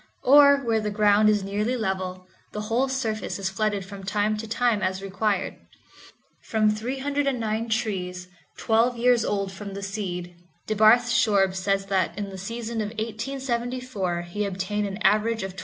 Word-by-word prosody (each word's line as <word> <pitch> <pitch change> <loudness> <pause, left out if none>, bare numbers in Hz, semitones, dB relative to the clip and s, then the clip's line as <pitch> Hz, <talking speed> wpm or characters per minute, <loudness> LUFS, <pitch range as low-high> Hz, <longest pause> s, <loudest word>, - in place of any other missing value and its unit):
Or, 280 +1 +7
where 230 -5 0
the 215 -1 -2
ground 210 0 +4
is 210 -2 +2
nearly 210 +6 -1
level, 185 -3 -3 0.3
the 210 - -3
whole 230 +5 0
surface 230 -5 -2
is 190 -1 -2
flooded 205 -1 -1
from 195 +1 -10
time 205 +2 0
to 225 +1 -6
time 225 -1 +1
as 190 -1 -1
required. 200 0 -1 0.8
From 215 -1 +1
309 250 -1 -2
trees, 185 -5 -2 0.3
twelve 230 +2 +2
years 240 -1 +3
old 200 -3 -1
from 195 0 -8
the 200 - -6
seed, 180 -3 -5 0.3
DeBarth 220 +3 +5
Shorb 200 -6 +3
says 195 +1 0
that 185 -3 0
in 200 -1 -4
the 190 - -8
season 230 +3 -4
of 210 - -2
1874 235 -4 -3
he 175 +5 -4
obtained 200 +1 -2
an 195 0 -5
average 215 +2 +2
of 190 -1 -6
$20. - - -8
210 Hz, 160 wpm, -25 LUFS, 195-230 Hz, 0.8 s, Or